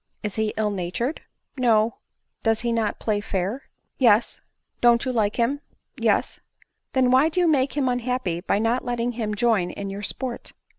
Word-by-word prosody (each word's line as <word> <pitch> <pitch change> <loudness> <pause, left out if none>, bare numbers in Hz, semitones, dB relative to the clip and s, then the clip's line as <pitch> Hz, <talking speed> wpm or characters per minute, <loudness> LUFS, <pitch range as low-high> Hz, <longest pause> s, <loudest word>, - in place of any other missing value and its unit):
" - - -45
Is 210 -2 -3
he 220 -1 +1
ill 215 -1 +1
natured 200 - -3
?" - - -54
" - - -45
No." 230 -3 +3 0.2
" - - -54
Does 225 -1 +2
he 235 0 0
not 225 -2 0
play 210 -2 -1
fair 205 +6 -3
?" - - -49
*Yes." 230 -3 +3 0.2
" - - -46
Don't 240 +1 +5
you 260 - 0
like 210 -3 +1
him 260 +5 0
?" - - -41
" - - -51
Yes." - - +1 0.3
" - - -53
Then 255 -1 +3
why 265 +5 +5
do 330 - -1
you 350 - +4
make 280 -2 +2
him 275 -3 +2
unhappy, 245 -8 -1
by 200 - +1
not 230 +4 +1
letting 240 0 -1
him 220 -3 -3
join 220 -6 +2
in 200 +2 -5
your 200 +1 -6
sport 245 +4 -5
235 Hz, 225 wpm, -24 LUFS, 210-255 Hz, 0.3 s, Don't